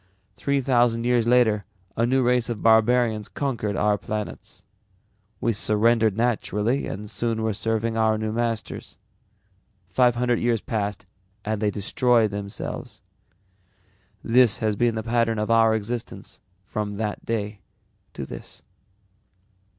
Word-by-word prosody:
Three 140 -1 0
thousand 120 -3 +2
years 120 -1 +2
later 115 -4 +3 0.3
a 115 +1 +1
new 130 +1 +2
race 125 0 +2
of 115 -4 -4
barbarians 110 -1 +3
conquered 110 -3 -2
our 105 0 +1
planets. 105 -1 -6 0.8
We 115 - +1
surrendered 110 0 +2
naturally 120 +1 0
and 105 +2 -6
soon 115 +1 -2
were 110 -1 0
serving 115 +2 -1
our 110 -1 +2
new 110 0 -2
masters. 115 -3 -3 0.9
Five 125 +2 +3
hundred 120 0 +1
years 120 -1 +1
passed 105 -2 -3 0.4
and 110 0 -2
they 105 - +2
destroyed 110 +2 +2
themselves. 100 0 -6 1.2
This 120 -1 +4
has 110 -1 0
been 120 +2 +1
the 110 - -3
pattern 115 -1 +1
of 105 +1 -1
our 115 -1 +5
existence 110 +2 -5 0.3
from 105 0 -4
that 105 -1 -3
day 105 -2 -3 0.5
to - - -5
this." - - -9
115 Hz, 130 wpm, -24 LUFS, 105-120 Hz, 1.2 s, our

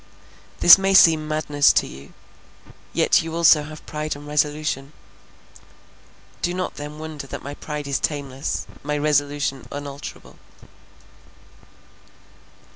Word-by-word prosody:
This 175 - +10
may 195 0 +1
seem 160 -4 +6
madness 150 -2 +2
to - - +2
you, 70 +2 -12 0.8
yet - - +3
you 165 0 -6
also 165 -2 +5
have 155 +1 -10
pride 155 0 -4
and 145 0 -11
resolution; 150 -1 -2 1.5
do 175 +1 -1
not 185 0 -3
then 150 +1 -8
wonder 155 -3 -8
that - - -8
my 140 - -6
pride 150 0 -6
is 140 -1 -1
tameless, 140 -3 -3 0.2
my 150 +1 -2
resolution 145 -2 -1
unalterable." 145 0 -9
150 Hz, 120 wpm, -22 LUFS, 145-155 Hz, 1.5 s, This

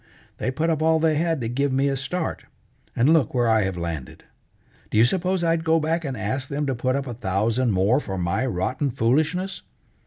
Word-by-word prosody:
They - - -1
put 155 +5 0
up 155 -1 -1
all 160 0 +4
they 160 0 +2
had 165 0 0
to 115 - -2
give 135 +4 0
me 135 +1 +2
a 135 - 0
start, 160 +6 -3 0.5
and 135 +7 +4
look 145 -7 +2
where 120 -1 +2
I 110 -1 +4
have 95 -2 -3
landed! 85 -6 -5 0.7
Do - - -1
you 110 - +7
suppose 185 +5 0
I'd 165 -1 +1
go 165 0 +3
back 165 +2 -1
and 135 -5 -4
ask 130 +6 -3
them 145 +1 -2
to 135 - 0
put 130 +2 -1
up 140 -1 -2
a 125 - -5
thousand 115 +3 0
more 100 +7 +3
for 95 -9 -5
my 90 +6 0
rotten 130 +7 -1
foolishness?" 155 - 0
135 Hz, 215 wpm, -24 LUFS, 115-160 Hz, 0.7 s, you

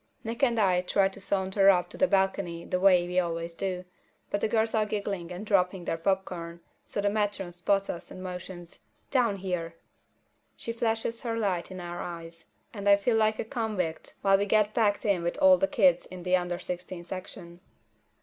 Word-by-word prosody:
Nick 230 0 -5
and 240 -4 +3
I 185 -3 +3
try 195 +2 +2
to 195 +1 -11
saunter 195 0 +2
up 180 -2 +4
to - - -8
the 280 - +5
balcony 190 -4 0
the 180 - -1
way 180 -2 +5
we 180 +1 +1
always 170 -1 -2
do, 185 0 -3 0.5
but 205 - 0
the - - +2
girls 220 0 +1
are 220 - +3
giggling 200 -4 -3
and 180 +4 -6
dropping 185 -3 +1
their - - -1
popcorn, 170 -2 -2 0.3
so 205 - -2
the 205 - +2
matron 205 -3 -1
spots 195 +3 0
us 170 - -6
and 185 - -9
motions. 180 -1 -8 0.3
"Down 240 -6 +2
here!" 180 -3 -4 0.8
She 230 - -4
flashes 230 0 -1
her 230 -2 -2
light 190 -6 -1
in 185 -1 -7
our 175 0 -5
eyes, 165 -1 -8 0.3
and 205 -2 -1
I 200 - +9
feel 210 +4 +1
like 215 0 +3
a - - -3
convict 215 -9 -3
while 195 0 +5
we 205 - 0
get 215 0 +3
packed 210 -3 +1
in 200 -4 +2
with 170 +7 -2
all 285 -1 +6
the 290 - +2
kids 190 - +3
in 180 -1 -9
the 180 +1 +3
under 175 -1 -1
sixteen 180 0 -6
section. 175 -1 -8
190 Hz, 200 wpm, -28 LUFS, 175-210 Hz, 0.8 s, I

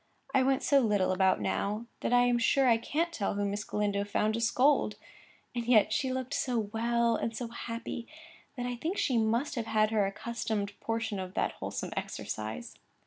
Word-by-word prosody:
I 270 - +5
went 265 0 +2
so 280 - +5
little 210 -7 +2
about 190 0 +3
now, 210 +3 -1
that - - -2
I 245 0 +6
am 245 -1 +3
sure 265 +3 +3
I 230 -2 +5
can't 330 +8 -1
tell 200 -8 -1
who 205 0 0
Miss 205 +1 -2
Galindo 205 -1 -1
found 210 +1 0
to 230 - -1
scold; 260 +5 +3 0.6
and 240 -1 -3
yet 225 -4 +5
she 260 -2 0
looked 260 +1 -3
so 250 -2 0
well 230 +2 +1
and 225 -1 -2
so 240 -1 -4
happy 230 0 -5 0.5
that 245 - -2
I 245 0 -2
think 335 +10 -2
she 250 -5 +2
must 230 +6 +1
have 235 -5 -3
had 215 0 +2
her 210 -3 +2
accustomed 205 -1 -3
portion 225 -3 -2
of 185 0 -6
that - - +1
wholesome - - -5
exercise. 105 -8 -5
230 Hz, 195 wpm, -30 LUFS, 205-245 Hz, 0.6 s, I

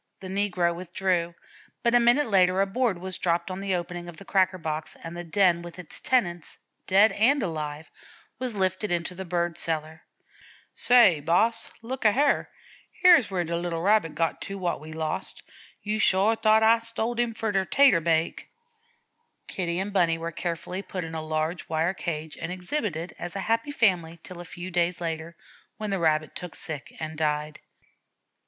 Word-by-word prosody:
The 185 - -8
negro 185 -3 +1
withdrew, 175 -1 -1 0.5
but 235 - +2
a 245 - +7
minute 240 +5 +4
later 185 -3 +3
a 195 - +4
board 215 0 0
was 185 +1 -5
dropped 175 +1 0
on 185 - -5
the 195 -1 0
opening 175 0 -5
of 165 - -11
the 200 - -12
cracker 185 -1 +2
box, 155 -2 -5
and 165 +1 -7
the 175 - -5
den 175 0 +3
with 175 0 -10
its 180 -4 -5
tenants, 175 -10 0 0.3
dead 200 +4 +6
and 255 +5 +3
alive, 155 -3 -5 0.5
was 250 -3 -3
lifted 190 +1 0
into 175 +1 -1
the 190 +1 -7
bird 175 -1 -1
cellar. 160 -1 -3 0.7
"Say, 235 -10 +5
boss, 210 +10 +1
look 255 +3 -5
a 215 -2 +5
hyar 280 +4 +2 0.5
hyar's 345 - +7
where 185 -2 -1
de 170 0 -3
little 170 -1 -3
Rabbit 195 -6 +2
got 165 +1 -1
to 195 - -5
wot 175 -5 -2
we 155 +1 -10
lost. 160 +3 -4 0.4
Yo' 210 +1 -1
sho 200 +1 +4
t'ought 220 -1 +3
Ah 225 +1 +5
stoled 230 +1 -2
him 235 -2 0
for 220 -1 -2
de 195 -1 +1
'tater 245 -5 +4
bake." 165 0 0 1.0
Kitty 170 -2 -3
and 195 +2 -3
Bunny 170 -4 +3
were 165 +1 -4
carefully 175 +3 -4
put 185 -1 -5
in 165 0 -7
a 160 - -3
large 155 +2 -3
wire 160 +3 +1
cage 160 -4 -5
and - - -4
exhibited 180 - -3
as 175 +1 -6
a - - -2
happy 230 +7 0
family 180 - +1
till 180 -2 -9
a - - -9
few 175 +2 -8
days 175 0 +1
later, 165 0 -4 0.4
when 215 -1 -4
the 195 - 0
Rabbit 155 -2 +1
took 180 -3 -7
sick 150 -3 -5
and 155 0 -5
died. 150 0 -1
180 Hz, 185 wpm, -26 LUFS, 165-205 Hz, 1.0 s, a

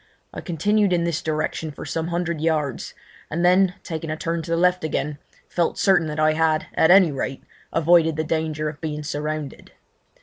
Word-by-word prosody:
I - - -6
continued 200 +3 +1
in 170 -1 +1
this 170 -1 -1
direction 155 0 -2
for - - -9
some 165 0 -3
hundred 170 -2 -2
yards, 155 -5 -1 0.3
and 170 +3 -1
then, 180 0 +4
making 160 -1 -4
a 155 - -3
turn 165 +1 -2
to 165 - -10
the 165 - +1
left 180 0 +2
again, 150 -2 -2 0.3
felt 170 -1 -1
certain 185 -4 +3
that 150 0 -4
I 155 0 +4
had, 155 0 +1
at 160 - +3
any 185 -3 +7
rate, 135 -1 -4 0.3
avoided 165 -1 +4
the 155 - -1
danger 155 -1 -2
of 150 0 -7
being 150 -2 -4
surrounded. 150 0 -5
160 Hz, 190 wpm, -23 LUFS, 155-170 Hz, 0.3 s, any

